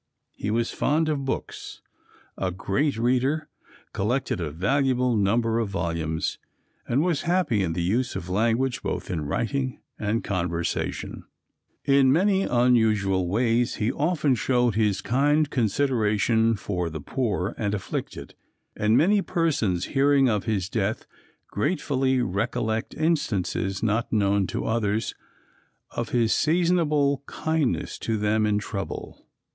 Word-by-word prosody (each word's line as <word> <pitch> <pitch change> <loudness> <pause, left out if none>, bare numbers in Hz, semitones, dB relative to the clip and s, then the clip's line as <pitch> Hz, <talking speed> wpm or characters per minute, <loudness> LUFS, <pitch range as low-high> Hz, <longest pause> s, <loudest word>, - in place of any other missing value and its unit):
He 105 - -5
was 115 +2 0
fond 155 +2 +1
of 140 -3 -1
books, 135 - -5 0.5
a 95 - -1
great 105 - -1
reader, 130 +6 +1 0.5
collected 110 -1 -1
a 80 - -2
valuable 125 - +1
number 115 +3 +2
of 110 -3 -1
volumes, 85 -4 -2 0.5
and 135 +6 +2
was 170 -5 0
happy 170 - +1
in 85 -3 -1
the 85 0 -2
use 115 +8 0
of 85 - -5
language 115 +7 +1
both 90 0 -4
in 85 -4 -2
writing 130 - -2 0.2
and 110 +2 -1
conversation. 85 -3 -3 0.6
In 135 -1 +5
many 190 +5 +3
unusual 110 - +2
ways 115 +3 +1
he 110 +2 0
often 150 -1 +1
showed 125 -1 +1
his 105 -2 +1
kind 145 +7 +2
consideration 115 -2 +2
for 90 -4 -3
the 80 0 -6
poor 105 - -2
and 105 -1 -1
afflicted, 100 - -5 0.4
and 105 +2 +2
many 200 +5 +4
persons 145 - 0
hearing 140 -1 +4
of 105 -4 0
his 100 -6 -1
death 105 +1 -2 0.4
gratefully 130 - 0
recollect 110 +3 -2
instances, 110 - -1
not 115 +1 0
known 100 -3 +2
to - - -3
others, 110 -1 0 0.8
of - - -3
his 115 -2 +2
seasonable 155 -4 +2
kindness 160 -4 -1
to 115 -1 -1
them 105 +1 +1
in 105 -1 +2
trouble. 105 -1 -6
115 Hz, 130 wpm, -25 LUFS, 100-135 Hz, 0.8 s, In